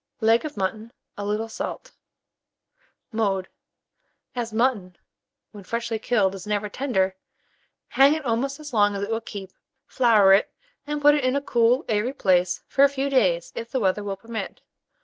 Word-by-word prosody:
Leg 225 +1 +3
of 305 -7 -7
mutton, 215 +4 -3 0.2
a 205 - -6
little 210 +2 -2
salt. 225 - -6 1.2
Mode. 200 -4 -1 0.9
As 235 -2 -3
mutton, 220 -6 0 0.5
when 205 -2 -11
freshly 230 +2 -3
killed, 205 -4 +1
is 195 0 -9
never 210 0 -1
tender, 195 -7 -1 0.7
hang 275 +3 +5
it 310 -2 -6
almost 260 +4 -1
as 295 -3 -9
long 205 -2 +3
as 200 - -3
it 205 - -4
will 225 0 -1
keep; 195 -4 -8 0.3
flour 220 -6 +4
it, 195 - +3 0.4
and 295 0 -3
put 295 0 +7
it 295 -2 0
in 255 +1 +1
a - - +2
cool 245 0 +2
airy 220 +4 0
place 180 -5 +1
for 275 - +3
a 280 - +6
few 280 0 -2
days, 185 -10 +2
if 230 0 -6
the 260 - -1
weather 200 -1 0
will 200 -1 -4
permit. 225 +2 -7
225 Hz, 170 wpm, -24 LUFS, 200-255 Hz, 1.2 s, put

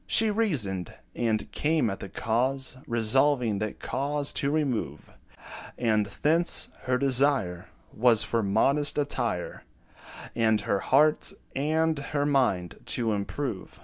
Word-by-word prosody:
She 220 -1 +4
reasoned, 125 - -1 0.2
and 110 -2 -1
came 155 -4 +1
at 95 - -6
the 95 - -8
cause, 130 +7 -1
Resolving 120 -1 +2
that 110 0 -4
cause 145 +1 -2
to 140 - 0
remove; 145 -6 -2 0.7
And 110 -3 +1
thence, 160 - +1 0.2
her 125 0 +1
desire 130 -9 +1 0.3
Was 115 -1 +4
for 115 - -1
modest 135 +10 +1
attire, 120 -10 -2 0.7
And 110 -2 +2
her 100 -1 0
heart 150 +8 +3 0.2
and 155 +2 +1
her 145 +1 -2
mind 125 - 0
to 115 -3 0
improve. 105 +1 -4
125 Hz, 120 wpm, -27 LUFS, 110-145 Hz, 0.7 s, She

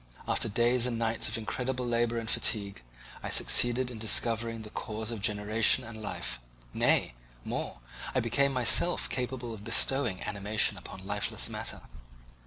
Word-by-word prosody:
After - - +2
days 120 +3 +2
and 120 -2 -3
nights 115 0 0
of 110 +1 -1
incredible 125 +3 -4
labour 120 0 -1
and 115 -1 -5
fatigue, 100 - -1 0.4
I - - -6
succeeded 125 +1 +3
in 115 - -9
discovering 115 +1 +3
the 105 - -11
cause 110 +1 -5
of 115 -3 -6
generation 105 +1 +2
and 110 -1 -9
life; 100 - -3 0.3
nay, - - +2 0.3
more, - - -5 0.3
I - - +3
became 135 +5 +1
myself 130 +7 +4
capable 125 -2 -4
of 105 -2 -11
bestowing 115 -2 +2
animation 105 +1 0
upon 95 0 -11
lifeless 105 0 -1
matter. - - -5
115 Hz, 150 wpm, -29 LUFS, 105-120 Hz, 0.4 s, myself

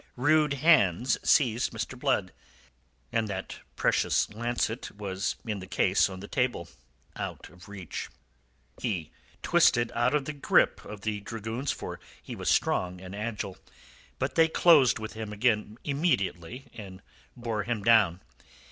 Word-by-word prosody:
Rude 150 +2 +3
hands 130 - +3
seized 125 -4 +3
Mr. 115 +3 -4
Blood, 125 -8 0 0.8
and 115 -1 0
that 100 - -5 0.2
precious - - +1
lancet 120 +1 -2
was 100 -1 -3
in 105 -3 -3
the 95 - -9
case 95 -1 +2
on 95 -1 -8
the 100 - -8
table 125 - -1 0.5
out - - -6
of 90 +3 -16
reach. 95 -5 -6 0.7
He 90 -10 -2 0.3
twisted 120 0 +3
out 120 +4 +2
of 145 -2 0
the 150 - -4
grip 140 - +2
of 105 -1 -9
the 105 0 -2
dragoons, 115 +5 -4
for - - -6 0.2
he - - -8
was - - -2
strong 90 0 +1
and 95 +1 -9
agile, 105 -3 -4 0.6
but 130 0 -2
they 165 +2 +5
closed 160 -6 +5
with 110 -1 -6
him 110 -1 -6
again 105 0 0
immediately, 135 - -1
and 95 -4 -10 0.3
bore 115 -3 -2
him 110 -1 -3
down. 105 -6 +4
110 Hz, 145 wpm, -28 LUFS, 100-125 Hz, 0.8 s, they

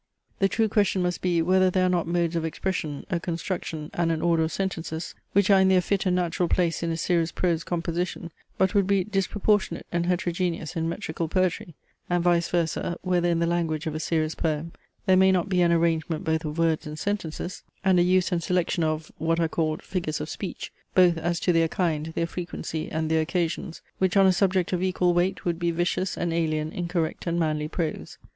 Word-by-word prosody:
The 195 - +3
true 220 +3 +1
question 200 -3 +2
must 180 0 -1
be, 175 -2 +2
whether 185 +2 +4
there 185 0 +2
are - - +3
not 175 -2 +1
modes 170 0 0
of 165 - 0
expression, 160 -2 -3
a 170 - +1
construction, 165 -2 -4
and 170 -1 +1
an 160 - 0
order 170 -1 +3
of 160 0 0
sentences, 165 -4 -3 0.2
which 200 0 +4
are 195 - +7
in 190 - +4
their 190 -1 +5
fit 195 +1 0
and 180 - +2
natural 175 -1 0
place 170 -2 +1
in 170 - -1
a 165 - -1
serious 170 -1 +1
prose 170 -3 0
composition, 170 0 -3 0.3
but 190 0 +2
would 200 -2 +3
be 200 -2 +3
disproportionate 205 +1 0
and 170 0 0
heterogeneous 175 -2 -1
in 165 0 -1
metrical 165 -3 -3
poetry; 180 -1 -1 0.3
and, 175 -1 +1
vice 175 -1 +2
versa, 170 0 -1
whether 175 -1 +1
in 170 - +2
the 170 - +1
language 165 -2 -1
of 160 - -2
a 155 - -3
serious 155 -1 0
poem 160 0 -2 0.3
there 190 -2 +5
may 190 0 +5
not 185 +1 +1
be 180 -2 +2
an 170 -1 +4
arrangement 165 -1 +1
both 160 -1 0
of 150 +1 -4
words 165 -2 +1
and 150 0 -6
sentences, 180 -2 -3 0.2
and 185 -2 +5
a - - +5
use 185 +1 +3
and 175 -2 0
selection 175 -1 0
of 155 0 -2
(what 165 +1 +1
are 165 - +2
called) 155 -1 -1
figures 170 -5 -3
of 155 - -5
speech, 195 - -6 0.2
both 180 -2 +6
as 170 +1 -1
to 180 - +2
their 165 0 +3
kind, 160 -3 -1
their 165 - +1
frequency, 170 -2 -5
and 160 0 -1
their 160 0 +3
occasions, 170 0 -2 0.2
which 190 +1 +2
on 195 - +6
a 190 - +5
subject 185 -1 +1
of 180 - 0
equal 180 -1 +2
weight 175 +2 0
would 170 -1 -1
be 170 -1 +1
vicious 175 +2 -1
and 170 -1 -1
alien 155 -2 0
in 175 -1 -3
correct 170 -1 -2
and 170 0 0
manly 155 -2 0
prose. 160 0 -4
170 Hz, 215 wpm, -26 LUFS, 165-185 Hz, 0.3 s, are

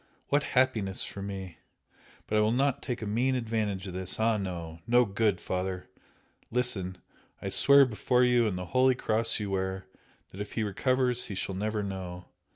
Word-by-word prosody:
What 145 +1 +2
happiness 110 -7 +2
for 100 - -7
me! 95 -3 -7 0.7
But 105 - +1
I - - +4
will 105 +1 +2
not 135 +2 +1
take 125 -3 -4
a - - -3
mean 120 +5 +1
advantage 110 -5 -2
of 95 - -7
this 95 +2 +1
ah, 110 0 +2
no! 85 -4 -5
no 120 +1 +5
good, 100 -2 0
Father! 90 0 -4 0.6
Listen! 100 -7 0 0.4
I - - -4
swear 140 0 +7
before 125 +2 +1
you 120 -2 +3
and 95 -4 -2
the 90 - -5
holy 130 +5 +3
Cross 110 -1 +1
you 105 -2 -4
wear, 95 0 -2 0.4
that 100 - -8
if 105 - -6
he 110 - -1
recovers 125 +4 +1
he 100 - -6
shall 95 - -3
never 105 +2 -2
know! 90 -2 -6
105 Hz, 180 wpm, -29 LUFS, 95-125 Hz, 0.7 s, swear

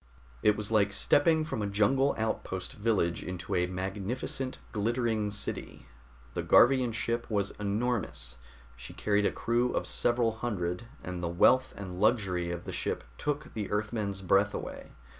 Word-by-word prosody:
It 105 0 +4
was 105 0 -3
like 105 -2 +3
stepping 155 - +4
from 155 -9 -3
a 105 - 0
jungle 110 +8 +2
outpost 95 -4 -3
village 105 -6 0
into 90 -3 -5
a 90 0 +2
magnificent, 100 +8 -3
glittering 110 -1 0
city. 105 0 -4 0.5
The - - -1
Garvian 125 -1 +5
ship 115 +1 -2
was 100 -2 0
enormous; 105 - -2 0.4
she - - -10
carried 105 -1 +2
a - - 0
crew 120 +1 +1
of - - -1
several 120 -1 +2
hundred, 95 -3 -2 0.2
and 90 -1 -5
the 85 - -1
wealth 130 +9 +4
and 95 -3 -6
luxury 95 -6 +2
of 85 0 -4
the - - -6
ship - - -2 0.2
took 150 0 -2
the 105 -2 -3
Earthmen's 105 -2 -2
breath 100 +3 +3
away. - - -7
105 Hz, 155 wpm, -30 LUFS, 95-120 Hz, 0.5 s, Garvian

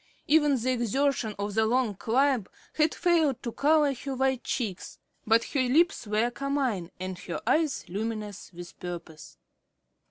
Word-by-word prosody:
Even 295 -2 +4
the 255 +3 0
exertion 245 -1 0
of 205 0 -3
the 220 +1 +2
long 245 -2 +1
climb 245 +2 +1 0.3
had 310 0 +2
failed 325 -7 +2
to 235 - -3
color 295 +2 +3
her 270 +1 -5
white 265 -1 0
cheeks, 210 -8 -4 0.3
but 225 +1 +5
her 280 - +2
lips 290 - +2
were 215 +3 +1
carmine 260 -10 -1
and 185 -1 -5
her 180 -1 -5
eyes 310 -3 +1
luminous 210 +1 -4
with 175 -1 -11
purpose. 165 -4 -8
240 Hz, 150 wpm, -28 LUFS, 205-280 Hz, 0.3 s, but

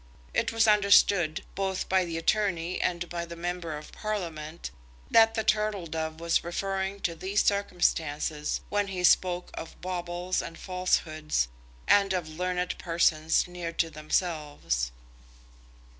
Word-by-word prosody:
It - - +1
was 225 0 +3
understood, 200 -5 +4
both 190 -1 -2
by 190 -1 +3
the 165 -1 -4
attorney 175 -1 0
and 175 0 -1
by 170 0 -4
the 170 0 -8
Member 170 -2 -3
of 150 - -11
Parliament, 170 -7 -5 0.4
that 225 0 +6
the 220 - 0
Turtle 210 -4 +1
Dove 160 0 -4
was 170 0 +1
referring 195 +3 -2
to 170 - 0
these 190 +5 0
circumstances 160 -6 0
when 205 -1 +1
he 185 -2 -4
spoke 180 0 +3
of 165 - -8
baubles 180 0 -2
and 165 - -8
falsehoods, 155 - 0 0.4
and 200 -1 +5
of 180 -3 -1
learned 180 +2 -2
persons 160 -2 +2
near 175 -1 -5
to 165 -1 0
themselves. 150 - -1
175 Hz, 135 wpm, -28 LUFS, 165-190 Hz, 0.4 s, that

